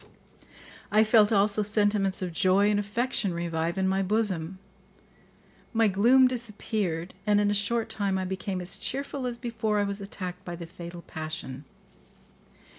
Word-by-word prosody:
I 215 +1 +5
felt 215 -1 +5
also 205 0 +3
sentiments 205 -2 +1
of 180 -2 -4
joy 190 +4 +3
and 205 - +2
affection 205 -2 -1
revive 170 0 -2
in 190 0 +1
my 190 +1 +1
bosom; 190 -4 0 1.2
my 225 -1 +4
gloom 240 +7 +5
disappeared, 210 -7 -3
and 205 0 +4
in 205 0 +2
a - - +2
short 220 +3 +1
time 200 -2 -1
I 185 - -2
became 190 0 -3
as 180 - -3
cheerful 275 -1 -3
as 240 -1 -4
before 225 -3 -2
I 205 - +2
was 200 0 -3
attacked 185 -2 -6
by 175 - -6
the 170 0 -7
fatal 170 0 -9
passion. 155 -3 -6
200 Hz, 155 wpm, -27 LUFS, 180-215 Hz, 1.2 s, I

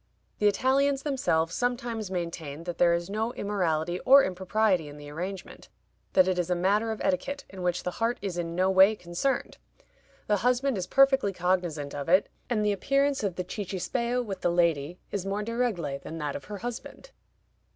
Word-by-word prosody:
The 210 - +4
Italians 270 +5 +2
themselves 175 - 0
sometimes 240 -3 -2
maintain 170 -4 -5
that 175 -1 -6
there 170 -1 +5
is 170 0 -3
no 220 +4 -2
immorality 175 -5 -1
or 275 +6 +7
impropriety 190 -1 +1
in 145 0 -10
the 145 0 -10
arrangement 180 +5 -7 0.4
that 185 -1 +5
it 185 -1 +1
is 175 0 -1
a 180 - +2
matter 205 +5 +1
of 220 - -4
etiquette, 280 +10 -1
in 190 -1 -8
which 180 0 -1
the 180 - -2
heart 235 +2 +1
is 195 -3 -4
in 170 -1 -3
no 185 +1 +2
way 190 +3 +6
concerned. 180 +9 -2 0.7
The 210 - +2
husband 250 +4 +1
is 185 -2 -3
perfectly 270 -7 +4
cognizant 175 -6 -1
of 145 +2 -5
it, 185 +3 +4 0.2
and 215 -3 +1
the 210 - +3
appearance 275 +6 +1
of 195 -4 -1
the 180 - -2
cicisbeo 225 +6 -2
with 195 -3 -6
the - - +2
lady 170 -2 +1
is 200 -3 -2
more 200 +2 -2
de 230 +2 -4
regle 175 - -1
than 165 - -7
that 150 -3 -3
of - - -7
her 210 - -6
husband. 245 - -7
190 Hz, 190 wpm, -28 LUFS, 175-230 Hz, 0.7 s, or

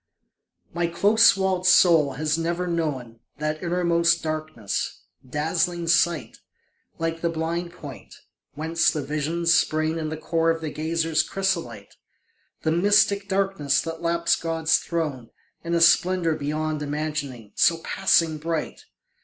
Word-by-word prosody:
My 170 0 0
close 205 +6 +4
walled 190 -1 0
soul 165 -6 +5
has 150 +3 -1
never 170 +2 -2
known 145 -9 -3 0.2
That 155 +1 -3
innermost 170 -1 +1
darkness, 155 -10 -4 0.3
dazzling 165 +4 -1
sight, 170 -1 +1 0.6
Like 165 0 -3
the 170 - 0
blind 165 +2 -3
point, 145 -6 -11 0.4
whence 160 +2 +1
the 150 -3 -3
visions 155 +4 0
spring 155 -1 +1
In 155 -1 -3
the 155 - -5
core 165 +1 0
of 165 0 0
the 160 -2 -5
gazer's 160 0 0
chrysolite... 170 - -3 0.7
The 160 - +1
mystic 200 +3 +3
darkness 195 -8 +1
that 165 +2 -6
laps 170 0 +1
God's 165 -1 +1
throne 150 -8 -4 0.3
In 170 0 -2
a - - +2
splendour 170 0 +4
beyond 155 +1 -3
imagining, 145 -6 -4
So 165 - +3
passing 165 -5 +1
bright. 165 0 -4
165 Hz, 130 wpm, -24 LUFS, 155-170 Hz, 0.7 s, soul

